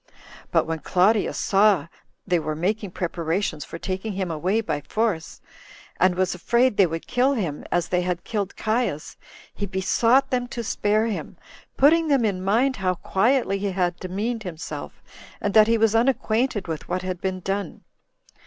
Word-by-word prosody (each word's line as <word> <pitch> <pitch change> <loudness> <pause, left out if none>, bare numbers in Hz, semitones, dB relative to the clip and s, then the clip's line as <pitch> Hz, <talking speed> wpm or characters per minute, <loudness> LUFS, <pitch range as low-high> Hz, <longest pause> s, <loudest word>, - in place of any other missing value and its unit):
But - - +2
when 160 0 -3
Claudius 190 +7 +2
saw 200 -3 +3 0.4
they 180 -3 +2
were 155 -1 -3
making 200 +5 -1
preparations 170 -2 -2
for - - -8
taking 190 +4 -4
him 185 -2 -2
away 180 +7 0
by 150 -8 -3
force, 200 +2 -2 0.6
and 185 0 +4
was 185 0 +1
afraid 235 +7 +2
they 195 -3 +5
would 165 0 -5
kill 255 +3 +2
him, 175 - -3
as 175 -2 +1
they 180 0 +1
had 180 -1 -2
killed 205 -3 -3
Caius, 220 -9 -1 0.4
he 205 - -4
besought 230 +7 +2
them 245 -1 0
to 240 -1 -5
spare 215 0 +1
him, 220 -3 -4 0.4
putting 320 +4 +5
them 275 -6 +3
in 190 -3 -1
mind 240 +7 +2
how 185 -2 0
quietly 200 +2 +1
he 200 -1 -2
had 180 -2 0
demeaned 210 +6 -3
himself, 175 -5 -7 0.4
and 205 - -2
that 215 -1 +7
he 230 0 +3
was 225 -1 +3
unacquainted 230 -3 +1
with 160 -2 -5
what 180 +1 -2
had 185 -1 -4
been 190 -1 -2
done. 195 -1 -4
195 Hz, 170 wpm, -24 LUFS, 180-225 Hz, 0.6 s, that